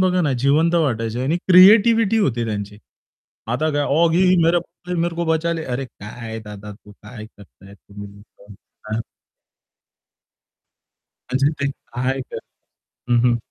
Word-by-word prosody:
बघा 185 -1 +2
ना, 145 -5 0
जिवंत 145 +7 +2
वाटायचे 120 -7 -1
आणि 145 +6 0
क्रिएटिव्हिटी 220 +4 +6
होती 120 - 0
त्यांची. 105 -1 -5 0.7
आता 140 +7 -1
काय 145 0 0 0.2
ऑगी 170 +2 +3
हो 185 -1 +4
मेरे 175 +1 -2
मेरे 170 0 -1
को 170 - -1
बचाले 160 0 -1
अरे 135 +2 -3
काय 110 -1 -9
दादा 105 0 -9
तू 105 0 -17
काय 110 +2 -12
करताय 100 -1 -17
तुम्ही 100 0 -12
लोकं 100 0 -18 0.4
हां. 110 - -1 2.3
म्हणजे 135 +3 +2
ते 140 0 0
काय 130 0 -4
करताय - - -11 0.6
हं, 120 - +4
हं. 120 - +1
135 Hz, 140 wpm, -20 LUFS, 110-170 Hz, 2.3 s, क्रिएटिव्हिटी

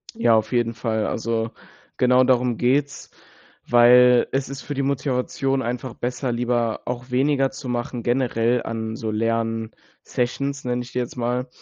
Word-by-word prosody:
Ja, 115 - +4
auf 110 - 0
jeden 120 -2 +1
Fall. 110 -1 -1
Also, 115 0 -2 0.5
genau 125 0 +4
darum 125 -2 +2
geht's, 140 +3 0 0.6
weil 125 +1 +6
es 135 0 -1
ist 140 0 -6
für 145 - -6
die 140 - -1
Motivation 135 0 -1
einfach 125 +1 -4
besser, 125 +1 -3
lieber 120 -1 -1
auch 125 +1 -5
weniger 135 +1 +2
zu 135 -1 -8
machen 120 0 -3
generell 120 -1 +1
an 110 -1 -4
so 110 -1 -4
Lern 115 0 -1 0.3
Sessions 140 +3 -2
nenne 125 0 -1
ich 125 - -13
die 125 - -2
jetzt 120 - -4
mal, 125 +2 -1
125 Hz, 160 wpm, -23 LUFS, 115-130 Hz, 0.6 s, weil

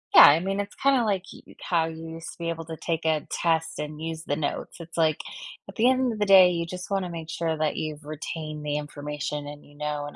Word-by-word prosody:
Yeah, - - +12
I 145 +3 +7
mean, 195 +3 -2
it's 205 0 -4
kinda 270 -3 +3
like 200 -4 0
y - - -14
how 170 -2 +1
you 160 0 -7
used 165 0 -7
to - - -19
be 170 0 -2
able 165 -1 -4
to 160 0 -7
take 165 0 -2
a 155 -2 +1
test 165 -1 0
and 150 0 -5
use 160 0 -4
the 145 - -1
notes, 145 -1 -3
it's 165 0 -10
like, 160 -2 +3 0.5
at - - -10
the 235 +3 +4
end 260 -2 +2
of 215 - -7
the 210 - +2
day, 190 -2 +8
you 170 -1 -1
just 180 +2 -7
wanna 195 -2 -1
make 165 -2 -7
sure 165 0 -1
that 155 -1 0
you've 155 -1 -4
retained 155 0 -5
the 145 0 0
information 150 0 -4
and 145 0 -9
you 145 - -18
know 150 0 -3
and 145 - -8
160 Hz, 255 wpm, -26 LUFS, 150-180 Hz, 0.5 s, Yeah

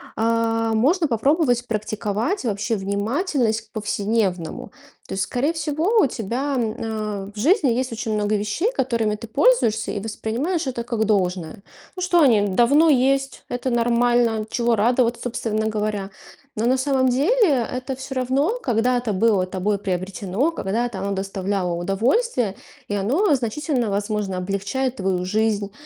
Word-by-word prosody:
а, 225 0 +1
можно 310 - +2
попробовать 245 0 +1
практиковать 215 - -2
вообще 215 +1 -1
внимательность 220 - 0
к 220 -1 -25
повседневному. 205 -5 -2 0.4
То - - -4
есть, 190 - 0
скорее 250 +9 0
всего, 325 +6 0
у 385 - +5
тебя, 250 +5 -3
а, 215 -3 -3
в - - -14
жизни 300 - +3
есть 255 +1 -1
очень 225 -1 -3
много 210 0 +1
вещей, 210 - -1
которыми 230 - 0
ты 220 +2 -9
пользуешься 225 - +2
и 205 - -3
воспринимаешь 230 - -2
это 240 -2 -3
как 235 -2 -1
должное. 185 -5 -1 0.4
Ну - - -4
что, 355 -2 +3
они 220 -8 +4
давно 240 - +4
есть, 270 -1 +2
это 245 +1 -2
нормально. 235 -2 +2
Чего 235 0 +1
радоваться, 235 +2 +2
собственно 225 -3 -2
говоря? 210 -2 -2 0.5
Но 220 - -1
на 260 +1 +3
самом 260 -1 +2
деле 285 - +2
это 255 +1 -4
всё 265 +1 -7
равно 275 - 0
когда-то 245 0 +1
было 200 -2 +2
тобой 195 +2 -1
приобретено, 195 - -1
когда-то 230 -5 -2
оно 200 +1 -2
доставляло 195 -1 -2
удовольствие, 215 - 0 0.3
и - - -3
оно 270 - +2
значительно, 250 0 -1
возможно, 205 -1 -2
облегчает 200 +8 -2
твою 185 -2 -1
жизнь 210 0 0
230 Hz, 145 wpm, -22 LUFS, 205-260 Hz, 0.5 s, у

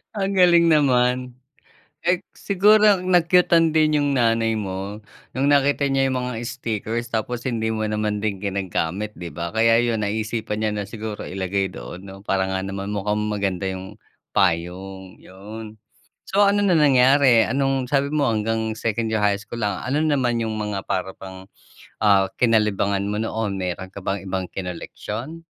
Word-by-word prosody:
Ang 195 -1 -1
galing 170 -2 +6
naman, 125 -4 +2 0.7
eh, 175 +1 +2 0.2
siguro 210 +1 +4
na-cute-an 175 -2 +3
din 155 -1 +3
yung 145 0 +1
nanay 115 -2 +2
mo 100 +1 -5 0.4
nung 135 +2 +1
nakita 140 0 +3
niya 135 -1 +2
yung 130 - -1
mga 120 -2 -4
stickers 115 0 -3
tapos 120 +3 -3
hindi 115 -3 -1
mo 110 -1 -1
naman 105 -1 -1
din 100 -2 -3
ginagamit, 100 +1 -2
'di 85 -1 -7
ba? 85 +4 -5
Kaya 115 +1 +4
'yon 115 -3 0
naisipan 110 +1 -2
niya 105 - +1
na 105 -1 -3
siguro 110 -1 -6
ilagay 95 0 -2
doon 70 +7 -9
'no 95 0 -10
para 95 -1 +1
nga 95 - -1
naman 100 +1 -5
mukhang 105 +1 -1
maganda 95 -2 -2
'yong 95 +2 -7 0.4
payong 95 +1 -1
'yon. 105 +3 -10 0.5
So, 205 +1 +4
ano 205 0 +2
na 190 - +3
nangyari? 130 -4 +5
Anong 135 0 0
sabi 140 0 +2
mo 150 -2 +1
hanggang 110 +1 -1
2nd 115 0 -1
year 110 - +1
high 100 -1 +3
school 115 +3 -8
lang, 105 -3 -1
ano 140 +4 0
naman 130 -6 +1
yung 110 -1 -2
mga 105 -2 -3
para 95 +1 -2
bang, 95 0 -10 0.6
ah, 100 -3 +4
kinalibangan 105 -4 +2
mo 105 +1 -2
noon 110 -3 -2
meron 95 0 -4
ka 100 - -10
bang 100 0 -2
ibang 95 -1 -3
kinoleksiyon? 105 - -6
110 Hz, 160 wpm, -22 LUFS, 100-130 Hz, 0.7 s, galing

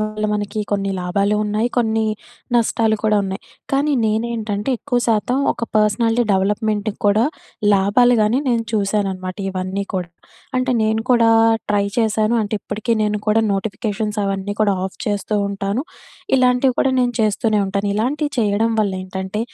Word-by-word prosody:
వల్ల 215 0 -3
మనకి 210 +1 -2
కొన్ని 195 -1 0
లాభాలు 200 +3 0
ఉన్నాయి, 210 +3 0
కొన్ని 225 -2 +1 0.5
నష్టాలు 225 -1 +2
కూడా 215 -1 +3
ఉన్నాయి. 190 0 -4 0.3
కానీ 285 +2 +2
నేనేంటంటే 220 0 -1
ఎక్కువ 250 -4 -1
శాతం 230 +3 +1 0.2
ఒక 235 - -4
పర్సనాలిటీ 225 +3 +2
డెవలప్‌మెంట్‌కి 210 +2 0
కూడా 210 +3 +4 0.5
లాభాలు 205 +6 +4
కాని 215 +4 +2
నేను 230 -2 +1
చూశాననమాట 195 -3 -1
ఇవన్నీ 185 +1 -3
కూడా. 180 -2 -2 0.5
అంటే 255 0 0
నేను 220 0 +1
కూడా 235 -2 +5 0.4
ట్రై 205 -1 +2
చేశాను. 220 0 +2
అంటే 210 +1 -3
ఇప్పటికీ 220 +3 -3
నేను 210 0 0
కూడా 215 +1 +4
నోటిఫికేషన్స్ 210 +1 -3
అవన్నీ 195 0 -2
కూడా 200 -2 +3
ఆఫ్ 190 - -11
చేస్తూ 205 +1 -1
ఉంటాను. 200 +3 -2 0.6
ఇలాంటివి 250 0 +3
కూడా 270 - +3
నేను 245 -1 +2
చేస్తూనే 215 0 +1
ఉంటాను. 200 +1 -2
ఇలాంటివి 285 +7 -1
చేయడం 220 +1 +2
వల్ల 200 -2 0
ఏంటంటే, 190 +2 -4
215 Hz, 145 wpm, -19 LUFS, 200-230 Hz, 0.6 s, కూడా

